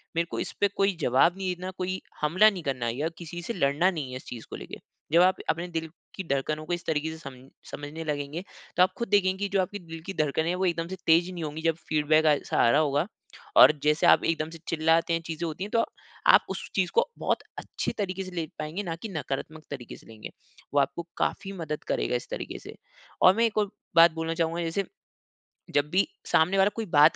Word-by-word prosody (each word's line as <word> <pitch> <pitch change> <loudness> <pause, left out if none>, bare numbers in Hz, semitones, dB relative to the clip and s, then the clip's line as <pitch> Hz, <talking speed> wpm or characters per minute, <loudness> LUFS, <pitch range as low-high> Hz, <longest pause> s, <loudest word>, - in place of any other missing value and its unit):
मेरे 170 +1 +2
को - - -3
इस - - -3
पे 205 - +6
कोई 195 -1 +2
जवाब 140 +8 +4
नहीं 185 -2 -2
देना, 180 +1 -6
कोई 185 0 -2 0.2
हमला 185 +8 +5
नहीं 190 -4 -5
करना 130 -4 -2
या 140 +7 -1
किसी 175 0 -7
से 205 +7 -4
लड़ना 155 +1 +2
नहीं 150 -7 -4
है - - -6
इस 130 - -13
चीज़ 115 -2 -8
को - - -6
लेके। - - -8 0.3
जब 170 +2 +6
आप 185 +1 +5
अपने 170 +2 0
दिल 165 -2 -4 0.3
की 190 - -4
धड़कन 150 +3 -1
को 175 - -2
इस 175 - -4
तरीक़े 160 0 0
से 160 - -8
सम 140 -5 -9 0.4
समझने 145 +3 -6
लगेंगे, 150 +2 -3 0.3
तो 180 - +7
आप 185 - +2
खुद 235 - -2
देखेंगे 190 -2 +3
की 200 0 -2
जो 190 - +5
आपकी 205 +3 -4
दिल 165 -2 -9
की 195 - -4
धड़कने 155 0 0
हैं, 180 - +1
वो 190 +1 0
एकदम 170 -2 0
से 190 - -5
तेज़ 170 +3 +5
नहीं 170 - -5
होंगी 155 +1 -5
जब 165 -1 +2
फ़ीडबैक 155 +1 +3
आ 150 -1 +6
सा - - +3
रहा 145 +6 +5
होगा। 145 +3 +1 0.5
और - - +10
जैसे 150 +1 +3
आप - - +6
एकदम 160 -1 0
से 165 - -10
चिल्लाते 165 +1 +2
हैं, 165 - 0
चीज़ें 165 +1 -4
होती 160 +4 -5
है 205 - -5
तो, 230 +1 +2 0.4
आप - - +7
उस - - -5
चीज़ - - +1
को 470 - +3
बहुत - - +1 0.2
अच्छे - - -3
तरीक़े 190 -2 -2
से 185 - -8
ले 170 -3 -2
पाएँगे 155 +7 -3
ना 165 -3 -3
कि 215 +6 -7
नकारात्मक 155 0 -5
तरीक़े 130 -4 -7
से - - -19
लेंगे, 110 -1 -9 0.4
वो 145 - +4
आपको 170 +4 0
काफ़ी 195 0 -1
मदद 155 -5 -5
करेगा - - 0
इस 120 - -4
तरीक़े - - -5
से - - -11 0.5
और 185 +2 +7
मैं 230 +1 +3
एक 220 - -1
और 210 -2 +2 0.3
बात 165 0 +8
बोलना 165 0 -2
चाहूँगा 165 0 -1
जैसे, 170 +4 -1 0.9
जब 145 0 +3
भी 190 +2 +3 0.2
सामने 180 +5 +4
वाला 195 +1 +5
कोई 225 -1 -3
बात 155 -2 +6
165 Hz, 235 wpm, -27 LUFS, 150-185 Hz, 0.9 s, और